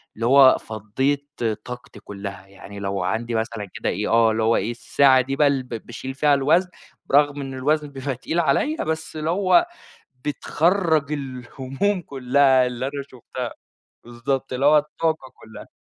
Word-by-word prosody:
اللي 115 - -3
هو 135 +1 +7
فضَّيت 130 +7 -2 0.4
طاقتي 125 -4 -9
كلها 100 -2 -8
يعني، 100 +1 -11
لو 100 -2 -2
عندي 115 +4 -2
مثلًا 110 -1 -2
كده - - -2
إيه، 105 +4 -2
آه 115 -1 +4
اللي 110 0 0
هو 115 +1 +3
إيه، 110 +5 -1
الساعة 130 +2 +4
دي 135 +2 -3
بقى 145 0 +4
ب 125 - -14
باشيل 120 +3 -6
فيها 145 +2 +3
الوزن، 160 +7 +3 0.4
برغم 145 0 +3
إن 135 -1 -6
الوزن 150 +3 0
بيبقى 135 -1 -4
تقيل 160 +7 -2
عليّا، 170 - +1
بس 160 0 -4
اللي 155 +1 -2
هو 195 - +4 0.6
بتخرِّج 160 +1 +1
الهموم 135 +7 -3
كلها 135 -2 +3
اللي 125 +1 -4
أنا 140 +1 -4
شُفتها 125 0 -6 0.5
بالضبط، 125 +3 -3
اللي 130 +2 0
هو 150 +1 +7
الطاقة 150 -2 -2
كلها. 110 -1 -12
135 Hz, 160 wpm, -22 LUFS, 115-145 Hz, 0.6 s, هو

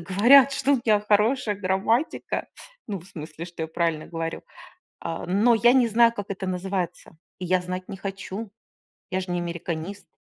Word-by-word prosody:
говорят, 240 +10 +6
что 275 +1 +1
у - - +3
меня 215 -2 +4
хорошая 210 +2 +2
грамматика, 205 +8 -1 0.4
ну, 195 -3 -3
в 175 - -16
смысле, 160 -1 -8
что 170 -2 -7
я 160 - -3
правильно 165 -2 -1
говорю. 165 -1 -4 0.6
Э, 165 -1 -4
но 210 +6 +4
я 240 +2 +5
не 250 -3 +4
знаю, 230 +1 +5
как 205 -3 -6
это 190 -1 -4
называется. 180 -2 -3 0.2
И 180 - -5
я 185 +1 +2
знать 185 +1 -5
не 195 - -6
хочу, 195 +2 -6 0.6
я 185 - 0
ж 180 - -7
не 175 - -1
американист. 170 +2 -5
190 Hz, 175 wpm, -25 LUFS, 175-220 Hz, 0.6 s, говорят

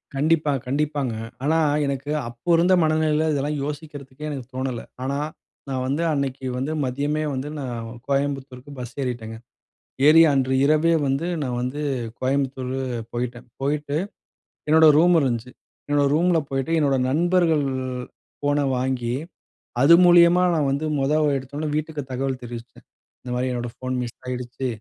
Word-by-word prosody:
கண்டிப்பா, 150 +1 +2 0.2
கண்டிப்பாங்க. 140 -2 -1 0.3
ஆனா, 155 +3 +2 0.3
எனக்கு 140 +1 -3 0.2
அப்போ 120 +7 -9
இருந்த 175 +3 +4
மனநிலையில, 155 0 +2
இதெல்லாம் 145 +1 -1
யோசிக்கிறதுக்கே 145 -1 -7
எனக்கு 135 -4 -5
தோணல. 130 -2 -2 0.2
ஆனா, 140 +2 -1 0.5
நான் 130 -1 -2
வந்து 145 +5 0
அன்னைக்கி 135 -2 -2
வந்து 135 +4 -2
மதியமே 145 +4 -1
வந்து, 135 +2 -3
நான் 120 -4 -5 0.2
கோயம்புத்தூருக்கு 140 -1 -2
பஸ் 125 -1 -7
ஏறிட்டேங்க. 115 -3 -4 0.7
ஏறி 160 +2 +8
அன்று 130 -1 +1
இரவே 155 +3 +3 0.2
வந்து 135 +4 0 0.2
நான் 125 -3 -2
வந்து 130 +4 -3 0.4
கோயம்புத்தூர் 130 -1 -1 0.4
போயிட்டேன். 120 0 -4
போயிட்டு 145 +1 -1 0.7
என்னோட 160 +1 +6
ரூம் 175 +3 +5
இருந்துச்சு. 125 -3 -1 0.4
என்னோட 145 0 +2
ரூம்ல 170 +2 +3
போயிட்டு 135 +4 -1
என்னோட 140 -3 +2
நண்பர்கள் 165 +1 +2 0.8
ஃபோன 145 0 +1
வாங்கி 125 -2 -1 0.7
அது 145 +5 +7
மூலியமா 175 0 +6
நான் 150 -3 +1
வந்து 140 +3 -1
மொத 135 +2 +1 0.2
எடுத்தோனே 140 +4 -5
வீட்டுக்கு 155 0 -3
தகவல் 130 0 -2
தெரிவிச்சேன். 120 0 -9 0.4
இந்த 125 - -7
மாதிரி 125 +1 0
என்னோட 120 -1 -3
ஃபோன் 130 0 -4
மிஸ் 120 -1 -5
ஆயிடுச்சு, 125 +1 -4
140 Hz, 135 wpm, -23 LUFS, 130-150 Hz, 0.8 s, ஏறி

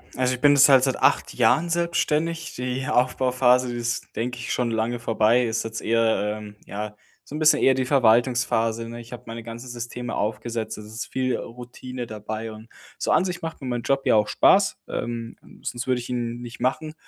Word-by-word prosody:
Also, 130 0 +1
ich 125 - -12
bin 145 -1 +6
jetzt 140 0 +7
halt 135 -2 +7
seit 130 -1 +1
8 - - +2
Jahren 170 +2 +3
selbstständig. 165 -1 0
Die 125 +2 -3
Aufbauphase, 125 -1 +3
die 120 - -4
ist, 120 0 -3
denke 125 +2 -3
ich, 120 - -3
schon 120 -2 0
lange 115 +2 -1
vorbei. 115 +1 +2
Ist 115 0 -1
jetzt 115 0 -5
eher, 110 -2 +1
ähm, 105 -1 -10
ja, 105 +1 -6 0.3
so 145 - -8
'n - - -3
bisschen 155 0 +5
eher 135 - +5
die 130 0 -1
Verwaltungsphase, 120 -2 +2
ne? 120 0 -7
Ich 115 - -14
habe 125 0 -8
meine 115 0 -7
ganzen 115 +2 -8
Systeme 120 0 -5
aufgesetzt, 110 +2 -3
es 105 - -9
ist 110 +2 -6
viel 130 -1 0
Routine 125 +1 -8
dabei 110 +1 -5
und 110 +1 -12 0.3
so - - 0
an 185 - +4
sich 180 -2 -4
macht 165 -2 -6
mir 135 - -5
mein 120 -1 -2
Job 135 +2 0
ja - - +4
auch 105 0 +3
Spaß, - - +4
ähm, 115 -1 -4 0.3
sonst 120 +1 -4
würde 125 -1 +1
ich 120 - -8
ihn 120 -1 -3
nicht 120 0 -9
machen. 155 +5 -1
120 Hz, 205 wpm, -24 LUFS, 115-130 Hz, 0.3 s, jetzt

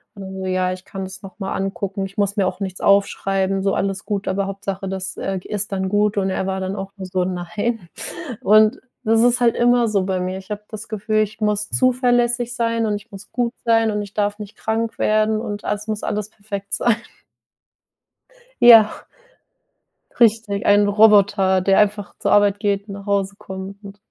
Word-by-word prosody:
Und 200 - -10
dann 190 0 -8
so: 190 - -4
„Ja, 185 0 0
ich 185 0 -10
kann 195 0 -7
das 190 +1 -9
noch 195 +1 -12
mal 195 - -3
angucken.“ 195 0 -3
Ich 195 +2 -11
muss 200 -1 +1
mir 195 -3 +2
auch - - -4
nichts 190 -2 -5
aufschreiben, 195 -1 +2
so 195 0 +1
alles 195 +1 -2
gut, 205 -1 -3
aber 195 +1 0
Hauptsache, 195 -1 -5
das, 190 0 -4
äh, 195 0 -3
g - - -14
ist 210 0 -2
dann 190 -1 -1
gut. 210 +1 +1
Und 195 -1 +1
er 190 0 -2
war 190 0 -2
dann 190 +1 -3
auch 195 -1 -6
nur 190 - -6
so: 185 0 -1
„Nein.“ 180 +3 -3 0.5
Und 215 +4 +5 0.3
das 225 +1 +4
ist 245 +1 +3
halt 240 -1 +3
immer 240 0 +3
so 205 -3 +1
bei 185 -1 -1
mir. 185 +1 -3
Ich 190 +2 -14
habe 210 0 -4
das 215 0 -8
Gefühl, 215 0 -1
ich 215 +1 -3
muss 210 -1 0
zuverlässig 245 -1 +1
sein 230 -1 0
und 210 -1 0
ich 205 - -9
muss 200 0 -12
gut 240 -1 -1
sein 225 -1 +3
und 210 0 -2
ich 205 -1 -9
darf 205 0 -1
nicht 210 -1 -9
krank 225 +1 -2
werden 215 0 +2
und 205 -1 -5
alles 210 +1 -3
muss 215 -1 -3
alles 210 0 -2
perfekt 200 -2 -7
sein. 235 -2 +2 1.6
Ja. 225 -3 +9 1.3
Richtig, 220 -3 +3
ein 205 0 +5
Roboter, 205 -2 +4
der 195 +1 +3
einfach 205 -1 0
zur - - 0
Arbeit 205 -1 +4
geht 200 0 -1
und 200 - -6
nach 200 0 -9
Hause 200 -1 0
kommt 190 +2 -8
und 200 0 -10
205 Hz, 205 wpm, -21 LUFS, 195-215 Hz, 1.6 s, Ja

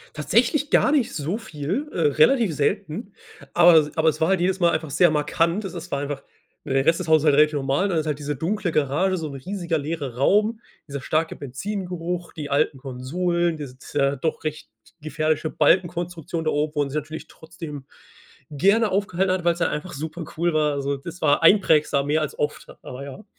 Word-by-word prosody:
Tatsächlich 235 - +1
gar 285 - +4
nicht 270 -6 +1
so 165 +7 -2
viel, 210 - -4
äh, - - -5
relativ 160 - +3
selten, 195 - -2 0.4
aber 175 0 +7
es 155 0 +3
aber 160 0 +2
es 160 - +1
war 160 - +3
halt 190 -2 +2
jedes 185 +1 0
Mal 170 - +5
einfach 160 -1 -2
sehr 165 +3 +4
markant. 165 +6 0
Es 190 - -6
s 175 0 -8
war 140 - -1
einfach, 145 -1 -4 0.4
der 135 0 0
Rest 165 +3 +3
des 160 - -5
Hauses 155 -1 +4
halt 145 -2 +5
relativ 150 0 +4
normal. 140 +8 0
Dann 170 - 0
ist 155 - 0
halt 150 -2 -1
diese 145 -2 -4
dunkle 185 +2 -1
Garage, 155 +7 +1
so 160 -2 -4
'n 140 - -8
riesiger 175 +2 -3
leerer 145 -4 -4
Raum, 210 - +2 0.3
dieser 140 -1 -6
starke 160 +4 -1
Benzingeruch, 175 +4 -5
die 145 -2 -7
alten 140 0 +1
Konsolen, 165 +6 -1
diese 130 -4 -8
t 140 0 -1
doch 160 -1 -2
recht 155 -5 -4 0.3
gefährliche 155 +1 -1
Balkenkonstruktion 170 0 0
da - - +2
oben 150 +1 -1
wo - - -1
man 140 -1 +1
sich 145 - -7
natürlich 155 +1 -5
trotzdem 160 -3 -9 0.7
gerne 200 +8 +3
aufgehalten 190 -1 0
hat, 185 -2 -2
weil's 170 0 +1
ja - - +2
einfach 175 +4 -5
supercool 160 +2 -3
war. 150 -2 +1
So, 140 +1 -1
das 170 +6 -9
war 145 +1 +3
einprägsam, 155 -7 +4
mehr 155 +1 +2
als 150 - -4
oft, 150 0 -3
aber 130 +2 -8
ja. 140 +10 -10
160 Hz, 200 wpm, -23 LUFS, 145-180 Hz, 0.7 s, aber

